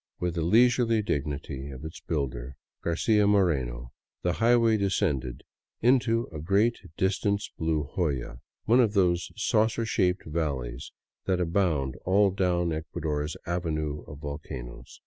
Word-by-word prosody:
With 90 Hz, -1 st, -1 dB
the 85 Hz, -, -2 dB
leisurely 115 Hz, +4 st, +4 dB
dignity 70 Hz, -4 st, -3 dB
of 70 Hz, +2 st, -8 dB
its 80 Hz, -, -7 dB
builder, 65 Hz, -5 st, -3 dB, 0.3 s
Garcia 105 Hz, +5 st, +2 dB
Moreno, 65 Hz, -12 st, +1 dB, 0.3 s
the 90 Hz, -, +1 dB
highway 115 Hz, +5 st, +4 dB
descended 85 Hz, -, -1 dB, 0.4 s
into 120 Hz, -1 st, +3 dB
a 80 Hz, -, -5 dB
great 100 Hz, +8 st, +2 dB, 0.2 s
distance 100 Hz, +2 st, 0 dB
blue 80 Hz, -2 st, 0 dB
hoyaj 70 Hz, -9 st, -2 dB, 0.3 s
one 120 Hz, +3 st, +5 dB
of 115 Hz, -5 st, +3 dB
those 90 Hz, -4 st, +2 dB
saucer 110 Hz, +1 st, +1 dB
shaped 90 Hz, -5 st, +1 dB
valleys 70 Hz, -5 st, -3 dB, 0.3 s
that 95 Hz, -2 st, +1 dB
abound 85 Hz, -7 st, 0 dB
all 100 Hz, +1 st, +4 dB
down 90 Hz, -3 st, +1 dB
Ecuador's 80 Hz, -1 st, -3 dB
avenue 75 Hz, -4 st, -2 dB
of 75 Hz, -, -9 dB
volcanoes. 70 Hz, -4 st, -8 dB
85 Hz, 125 wpm, -27 LUFS, 75-100 Hz, 0.4 s, one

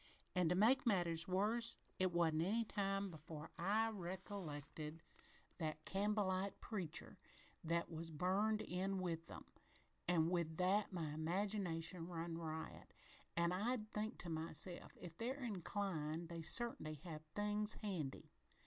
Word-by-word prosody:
"An', 180 Hz, -3 st, +4 dB
to 180 Hz, -, +4 dB
make 245 Hz, +7 st, +5 dB
matters 170 Hz, -5 st, +4 dB
worse, 220 Hz, +5 st, +3 dB, 0.2 s
it 185 Hz, -1 st, +3 dB
wasn't 165 Hz, -2 st, +3 dB
any 220 Hz, +7 st, +2 dB
time 195 Hz, -2 st, 0 dB
before 155 Hz, 0 st, -7 dB
I 220 Hz, +3 st, +3 dB
recollected 170 Hz, -5 st, -5 dB, 0.6 s
that 155 Hz, -1 st, -2 dB
Campbellite 200 Hz, -1 st, +1 dB
preacher 190 Hz, -9 st, -3 dB, 0.5 s
thet 170 Hz, +1 st, +1 dB
was 165 Hz, -1 st, -3 dB
burned 195 Hz, +7 st, +2 dB
in 190 Hz, +1 st, 0 dB
with 170 Hz, -2 st, -2 dB
them, -, -, -8 dB, 0.6 s
an' 170 Hz, -2 st, +4 dB
with 170 Hz, -3 st, 0 dB
that 195 Hz, +3 st, +3 dB
my 165 Hz, -5 st, -2 dB
imagination 170 Hz, 0 st, 0 dB
run 170 Hz, -1 st, -3 dB
riot, 160 Hz, -1 st, -5 dB, 0.5 s
an' 170 Hz, 0 st, +4 dB
I'd 215 Hz, +3 st, 0 dB
think 215 Hz, +2 st, -1 dB
to 175 Hz, -, -5 dB
myself, 160 Hz, +2 st, -3 dB
'If 170 Hz, -2 st, -7 dB
they're 260 Hz, +4 st, -1 dB
inclined, 175 Hz, -6 st, -1 dB
they 170 Hz, -1 st, -4 dB
cert'n'y 160 Hz, -, +1 dB
have 160 Hz, -4 st, -5 dB
things 210 Hz, +1 st, +2 dB
handy!' 170 Hz, -10 st, -3 dB
180 Hz, 130 wpm, -42 LUFS, 165-205 Hz, 0.6 s, make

